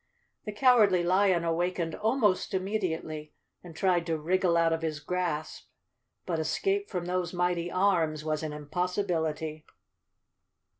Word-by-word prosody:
The 210 Hz, -, -3 dB
Cowardly 210 Hz, -5 st, +4 dB
Lion 185 Hz, -1 st, +3 dB
awakened 170 Hz, 0 st, -1 dB
almost 220 Hz, -4 st, +1 dB
immedi¬ 190 Hz, -3 st, -1 dB
ately 155 Hz, -1 st, -8 dB, 0.3 s
and 170 Hz, -3 st, -11 dB
tried 175 Hz, -1 st, +1 dB
to 165 Hz, -1 st, 0 dB
wriggle 175 Hz, +2 st, +1 dB
out 165 Hz, -1 st, +3 dB
of 165 Hz, -, -2 dB
his 155 Hz, -2 st, -2 dB
grasp, 160 Hz, -1 st, -3 dB, 0.6 s
but 165 Hz, -3 st, -1 dB
escape 390 Hz, -, -1 dB
from 175 Hz, -1 st, -3 dB
those 180 Hz, -1 st, -2 dB
mighty 175 Hz, -1 st, 0 dB
arms 165 Hz, -5 st, +1 dB
was 155 Hz, -1 st, -1 dB
an 155 Hz, -1 st, -4 dB
impossibility. 160 Hz, -1 st, -2 dB
175 Hz, 135 wpm, -29 LUFS, 160-185 Hz, 0.6 s, Cowardly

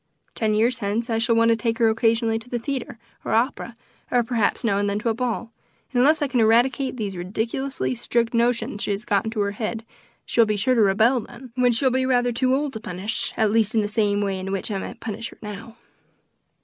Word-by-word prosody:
Ten 215 Hz, -2 st, 0 dB
years 235 Hz, +3 st, +2 dB
hence 225 Hz, +3 st, -2 dB
I 225 Hz, -, +1 dB
shall 230 Hz, 0 st, +2 dB
want 230 Hz, 0 st, +4 dB
to 230 Hz, -, +5 dB
take 230 Hz, 0 st, -1 dB
her 230 Hz, -, +4 dB
occasionally 225 Hz, 0 st, +2 dB
to 235 Hz, +2 st, -12 dB
the 245 Hz, -, -1 dB
theatre 245 Hz, -1 st, -4 dB, 0.3 s
or -, -, -2 dB
opera, 235 Hz, 0 st, 0 dB, 0.3 s
or 245 Hz, -1 st, +2 dB
perhaps 230 Hz, -1 st, 0 dB
now 200 Hz, -4 st, +1 dB
and 205 Hz, 0 st, 0 dB
then 200 Hz, -, -1 dB
to 230 Hz, +2 st, -1 dB
a -, -, +2 dB
ball, 235 Hz, -1 st, -3 dB, 0.4 s
and 250 Hz, -, +1 dB
unless 300 Hz, +4 st, +4 dB
I -, -, +1 dB
can 255 Hz, -2 st, 0 dB
eradicate 245 Hz, +4 st, +3 dB
these 205 Hz, -4 st, -3 dB
ridiculously 225 Hz, +10 st, -2 dB
strict 235 Hz, -1 st, -1 dB
notions 235 Hz, -2 st, 0 dB
she -, -, -2 dB
has 205 Hz, +3 st, -2 dB
got 200 Hz, -2 st, +1 dB
into 220 Hz, -1 st, -2 dB
her 200 Hz, 0 st, 0 dB
head, 220 Hz, +2 st, -4 dB, 0.4 s
she -, -, -3 dB
will 230 Hz, -, +7 dB
be 210 Hz, -1 st, 0 dB
sure 230 Hz, +6 st, +2 dB
to 235 Hz, -, +3 dB
rebel 220 Hz, +6 st, +4 dB
then, 240 Hz, +2 st, -11 dB
when 250 Hz, 0 st, +3 dB
she 235 Hz, +4 st, 0 dB
will 260 Hz, -, +4 dB
be 260 Hz, +1 st, +1 dB
rather 245 Hz, -1 st, +2 dB
too 255 Hz, +2 st, +1 dB
old 285 Hz, 0 st, -2 dB
to 220 Hz, -, -5 dB
punish, 195 Hz, +1 st, -4 dB
at 220 Hz, -2 st, +2 dB
least 220 Hz, 0 st, +2 dB
in 220 Hz, -, +4 dB
the 205 Hz, -, -1 dB
same 205 Hz, -1 st, +1 dB
way 195 Hz, -2 st, -1 dB
in 190 Hz, +1 st, -5 dB
which 195 Hz, +2 st, -3 dB
I 195 Hz, -, -1 dB
might 235 Hz, +4 st, -8 dB
punish 225 Hz, +1 st, -5 dB
her -, -, -16 dB
now." 210 Hz, +2 st, -9 dB
230 Hz, 240 wpm, -23 LUFS, 210-245 Hz, 0.4 s, will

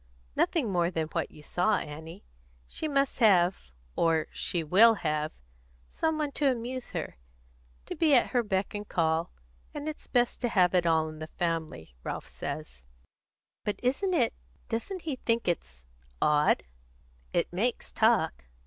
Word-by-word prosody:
"Nothing 270 Hz, -, +1 dB
more 175 Hz, -2 st, +2 dB
than 160 Hz, -3 st, -2 dB
what 165 Hz, -3 st, -2 dB
you 150 Hz, -, -15 dB
saw, 180 Hz, +7 st, +2 dB
Annie. 160 Hz, +5 st, -8 dB, 0.4 s
She 310 Hz, -, -4 dB
must 275 Hz, -3 st, +1 dB
have 185 Hz, -, +4 dB, 0.3 s
or 165 Hz, -2 st, +2 dB
she 170 Hz, -2 st, -1 dB
will 215 Hz, +9 st, +6 dB
have 155 Hz, -4 st, -1 dB, 0.6 s
some 320 Hz, -1 st, 0 dB
one 300 Hz, -2 st, -1 dB
to 285 Hz, 0 st, +2 dB
amuse 250 Hz, +1 st, -4 dB
her; -, -, -5 dB, 0.7 s
to -, -, -5 dB
be 310 Hz, -4 st, +4 dB
at 245 Hz, -, +3 dB
her 245 Hz, -, +3 dB
beck 195 Hz, -3 st, -1 dB
and 205 Hz, 0 st, -6 dB
call; 165 Hz, 0 st, +1 dB, 0.4 s
and 295 Hz, +1 st, -4 dB
it's 310 Hz, -, -6 dB
best 245 Hz, -1 st, +1 dB
to 240 Hz, -, +1 dB
have 185 Hz, -5 st, +3 dB
it 175 Hz, -2 st, +3 dB
all 160 Hz, -1 st, +3 dB
in 155 Hz, 0 st, -8 dB
the 155 Hz, -, -5 dB
family, 160 Hz, -, -3 dB
Ralph -, -, -5 dB
says." 65 Hz, 0 st, -7 dB, 0.8 s
"But 210 Hz, -1 st, -2 dB
isn't 355 Hz, +10 st, +1 dB
it 245 Hz, -8 st, +2 dB, 0.4 s
doesn't 350 Hz, -, -3 dB
he 295 Hz, -5 st, -3 dB
think 230 Hz, -3 st, 0 dB
it's 65 Hz, -, -3 dB, 0.3 s
odd?" 150 Hz, 0 st, +3 dB, 0.7 s
"It -, -, 0 dB
makes -, -, -1 dB
talk." 65 Hz, +1 st, +2 dB
185 Hz, 160 wpm, -29 LUFS, 160-245 Hz, 0.8 s, will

